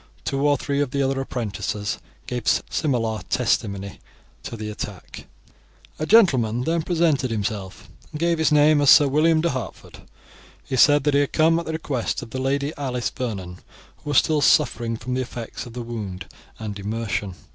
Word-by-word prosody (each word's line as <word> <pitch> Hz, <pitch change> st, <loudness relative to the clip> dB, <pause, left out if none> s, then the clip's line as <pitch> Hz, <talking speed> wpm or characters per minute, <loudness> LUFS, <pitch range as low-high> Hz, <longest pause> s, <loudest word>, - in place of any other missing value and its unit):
Two 140 Hz, +1 st, 0 dB
or 145 Hz, -1 st, +3 dB
three 140 Hz, +2 st, -1 dB
of 145 Hz, -, 0 dB
the 140 Hz, +1 st, 0 dB
other 135 Hz, 0 st, 0 dB
apprentices 105 Hz, -3 st, -3 dB, 0.3 s
gave 125 Hz, -2 st, -5 dB, 0.2 s
similar 115 Hz, -7 st, 0 dB
testimony 100 Hz, -5 st, -1 dB, 0.4 s
as -, -, -5 dB
to 115 Hz, -, -7 dB
the 110 Hz, 0 st, -5 dB
attack. 100 Hz, -3 st, -8 dB, 0.7 s
A 155 Hz, -, -2 dB
gentleman 130 Hz, -, +4 dB
then 165 Hz, +3 st, 0 dB
presented 160 Hz, -6 st, +1 dB
himself, 105 Hz, -3 st, -4 dB, 0.2 s
and 150 Hz, -, -7 dB
gave 170 Hz, 0 st, +1 dB
his 160 Hz, -, +2 dB
name 150 Hz, 0 st, +5 dB
as 145 Hz, -, +4 dB
Sir 145 Hz, -3 st, +8 dB
William 155 Hz, +3 st, +3 dB
de 170 Hz, -, +1 dB
Hertford. 130 Hz, -3 st, -7 dB, 0.6 s
He 135 Hz, -, -4 dB
said 145 Hz, +2 st, +5 dB
that 145 Hz, 0 st, +1 dB
he 140 Hz, -, +4 dB
had 145 Hz, -, 0 dB
come 165 Hz, +1 st, +4 dB
at 170 Hz, -, -7 dB
the 160 Hz, -, -3 dB
request 145 Hz, -6 st, -2 dB
of 115 Hz, -, -11 dB
the 130 Hz, -, -3 dB
Lady 140 Hz, +3 st, -1 dB
Alice 125 Hz, -4 st, -2 dB
Vernon, 95 Hz, -8 st, -5 dB, 0.4 s
who 150 Hz, -, -9 dB
was 145 Hz, -, +2 dB
still 155 Hz, -2 st, +3 dB
suffering 120 Hz, -7 st, +2 dB
from 125 Hz, +3 st, -5 dB
the 130 Hz, -, 0 dB
effects 120 Hz, -1 st, -7 dB
of 120 Hz, -, -11 dB
the 120 Hz, 0 st, -5 dB
wound 105 Hz, -6 st, -6 dB, 0.3 s
and 105 Hz, -2 st, -6 dB
immersion. 105 Hz, -2 st, -3 dB
130 Hz, 185 wpm, -23 LUFS, 110-145 Hz, 0.7 s, Sir